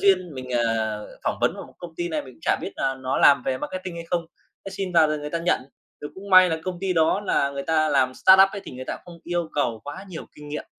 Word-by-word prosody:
duyên, 185 -5 +2
mình, 130 -1 -7
ờ, 110 -3 -1
phỏng - - -1
vấn - - +2
vào - - -8
một - - -19
công 170 -2 -9
ty 175 0 -2
này, 155 -2 -2
mình 130 -2 -13
cũng - - -25
chả - - +2
biết - - -5
là 135 - 0
nó 130 0 -2
làm 140 -3 +6
về 130 -1 -1
marketing 185 -1 -5
hay 170 - -6
không, 170 -2 0 0.4
thế 195 - -6
xin 190 -2 -4
vào 165 -2 +6
rồi 155 0 -1
người 150 0 -6
ta 170 - -1
nhận. 170 +1 +1 0.4
Rồi 145 - -7
cũng 200 +1 -10
may 185 -1 +8
là 160 - -1
công 180 -2 -4
ty 190 -1 0
đó 165 +4 +2
là 140 -8 +1
người 140 0 -5
ta 155 0 +2
làm 130 -3 +2
startup 190 +5 +7
ấy 200 - -5
thì - - -9
người 130 +1 -7
ta - - -5
không 175 -1 -12
yêu 175 -2 -2
cầu 115 -6 0
quá 145 +7 -7
nhiều 175 -4 -8
kinh 150 0 -11
nghiệm. 150 - -5
160 Hz, 285 wpm, -24 LUFS, 135-180 Hz, 0.4 s, may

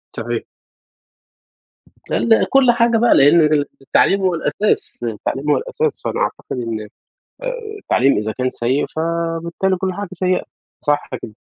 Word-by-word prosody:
صحيح. - - -3 1.7
لا، - - 0
لا 225 -1 +3
كل 270 -2 +5
حاجة 235 -1 +3
بقى، 235 +1 +4
لإن 145 +5 +6
ال 150 -1 +3 0.2
التعليم 195 +8 +2
هو 185 -1 +2
الأساس، 205 +5 -1
التعليم 120 +5 -3
هو - - +4
الأساس، 465 -2 -2
فأنا - - -2
أعتقد - - -3
إن 115 -3 -4 0.6
آآ - - -6 0.3
التعليم 140 - +2
إذا 110 +1 -2
كان 130 0 -1
سيء، 130 +5 0
فبالتالي 170 +3 -1
كل 185 +1 -2
حاجة 205 0 -5
سيئة، 185 0 0 0.4
صح 145 -1 +1
كده. 105 - -8
170 Hz, 145 wpm, -19 LUFS, 135-205 Hz, 1.7 s, لإن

